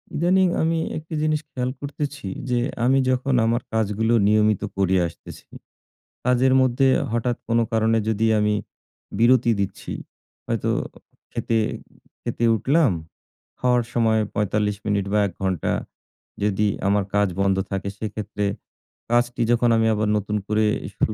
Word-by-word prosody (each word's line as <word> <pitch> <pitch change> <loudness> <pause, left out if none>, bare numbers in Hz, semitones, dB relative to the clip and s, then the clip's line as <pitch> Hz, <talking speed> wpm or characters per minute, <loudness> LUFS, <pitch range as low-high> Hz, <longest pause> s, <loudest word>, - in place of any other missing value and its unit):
ইদানীিং 185 +3 +3
আমি 165 0 +1 0.2
একটা 160 +1 -8
জিনিস 155 0 +1
খেয়াল 125 -1 -2
করতেছি 145 -4 -5 0.2
যে 120 -1 +2 0.3
আমি 135 +2 +4
যখন 130 +1 +1
আমার 115 +2 +1
কাজগুলো 110 +1 +1
নিয়মিত 105 -1 +3 0.2
করে 95 -1 +2
আসতেছি, 85 - -12 0.8
কাজের 125 +1 +3
মধ্যে 130 +1 +3 0.2
হঠাৎ 120 +1 0
কোনো 115 0 +2
কারণে 110 0 +2
যদি 110 0 +1
আমি 105 0 +2 0.7
বিরতি 120 0 +4
দিচ্ছি, 100 +1 -3 0.5
হয়তো - - -1 0.6
খেতে, 115 - 0 0.6
খেতে 120 - -1
উঠলাম। 140 - +3 0.7
খাওয়ার 125 -1 +2
সময় 110 -2 +2
৪৫ 105 0 0
মিনিট 100 -2 0
বা 105 - +4
১ 95 - -9
ঘণ্টা 95 -4 0 0.7
যদি 105 0 +1 0.2
আমার 100 0 +2
কাজ 105 0 +3
বন্ধ 95 -1 +2
থাকে, 100 0 -2
সেক্ষেত্রে 105 -1 -4 0.7
কাজটি 120 0 +1
যখন 120 0 +3
আমি 115 0 +3
আবার 105 0 0
নতুন 105 +1 -2
করে 110 0 +2 0.3
শুরু 110 - 0
115 Hz, 135 wpm, -23 LUFS, 105-125 Hz, 0.8 s, আমি